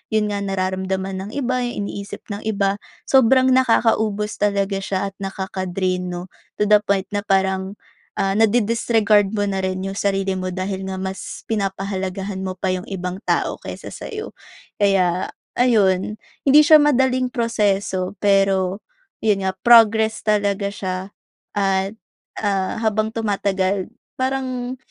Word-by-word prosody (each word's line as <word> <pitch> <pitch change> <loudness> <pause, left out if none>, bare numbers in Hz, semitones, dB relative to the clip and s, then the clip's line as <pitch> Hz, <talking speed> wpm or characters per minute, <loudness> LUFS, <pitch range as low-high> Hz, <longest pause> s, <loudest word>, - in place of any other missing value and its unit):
’yon 210 -1 +2
nga, 205 - -2
nararamdaman 190 0 -2
ng 215 - -9
iba, 255 -2 0
’yong 240 -4 -3
iniisip 200 0 -7
ng 200 - -4
iba, 200 -2 +1 0.3
sobrang 260 0 +5
nakakaubos 225 -4 +2
talaga 200 -1 +1
siya 195 0 -2
at 195 - -45
nakaka-drain, 185 -1 -3
’no. 180 +1 -6 0.3
To - - +6
the 210 0 +7
point 195 -1 0
na 205 - 0
parang, 190 0 +1 0.4
ah, 195 0 0
na 225 - +6
di-disregard 220 -2 +2
mo 205 -1 0
na 195 -1 -1
rin 185 0 -2
’yong 195 +1 -4
sarili 195 -1 0
mo 185 0 -3
dahil 190 +1 -3
nga 190 0 -4
mas 190 0 -5
pinapahalagahan 195 -2 -3
mo 185 - -3
pa 185 +1 -3
’yong 185 0 -2
ibang 180 -1 -4
tao - - 0
kaysa - - -8
sa’yo. 430 -1 -7 0.4
Kaya 185 -3 +1 0.2
ayon, 210 -5 +2 0.3
hindi 290 +2 +8
siya 310 +1 +8
madaling 260 -3 +2
proseso, 205 -6 0
pero 195 -1 +2 0.4
’yon 200 -3 +2
nga, 190 - +1
progress 220 -2 +6
talaga 205 -2 +1
siya 190 -2 -4 0.6
at, 195 +1 +1 0.5
ah, 195 -2 0
habang 215 0 +1
tumatagal, 195 -3 0 0.3
parang 260 -1 -2
200 Hz, 140 wpm, -21 LUFS, 190-220 Hz, 0.6 s, hindi